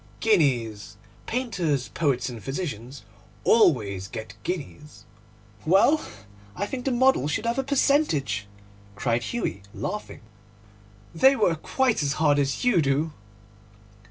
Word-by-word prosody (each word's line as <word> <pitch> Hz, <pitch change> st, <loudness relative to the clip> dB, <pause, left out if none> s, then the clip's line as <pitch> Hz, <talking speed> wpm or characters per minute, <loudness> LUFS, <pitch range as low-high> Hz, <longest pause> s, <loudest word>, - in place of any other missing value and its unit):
'Guineas. 120 Hz, -, +1 dB, 0.3 s
Painters, 185 Hz, -, -1 dB
poets, 135 Hz, -6 st, 0 dB
and 120 Hz, -5 st, -7 dB
physicians 135 Hz, -, -5 dB, 0.4 s
always 105 Hz, -, +3 dB
get 110 Hz, -1 st, -7 dB
guineas.' 150 Hz, -3 st, -6 dB, 0.6 s
'Well, 200 Hz, -, +4 dB, 0.5 s
I 205 Hz, -, -2 dB
think 250 Hz, +4 st, -6 dB
the 270 Hz, -, +1 dB
model 255 Hz, -, +3 dB
should 180 Hz, +9 st, -2 dB
have 235 Hz, +3 st, 0 dB
a -, -, +1 dB
percentage,' 260 Hz, -, +1 dB, 0.5 s
cried 115 Hz, +3 st, 0 dB
Hughie, 215 Hz, -, -3 dB
laughing; 210 Hz, +2 st, -5 dB, 0.9 s
'they 265 Hz, +11 st, +5 dB
work 170 Hz, -10 st, +1 dB
quite 260 Hz, -8 st, +1 dB
as 140 Hz, -1 st, 0 dB
hard 150 Hz, -2 st, +2 dB
as 135 Hz, -1 st, -1 dB
you 215 Hz, -9 st, +4 dB
do. 145 Hz, +3 st, 0 dB
155 Hz, 120 wpm, -25 LUFS, -, 0.9 s, they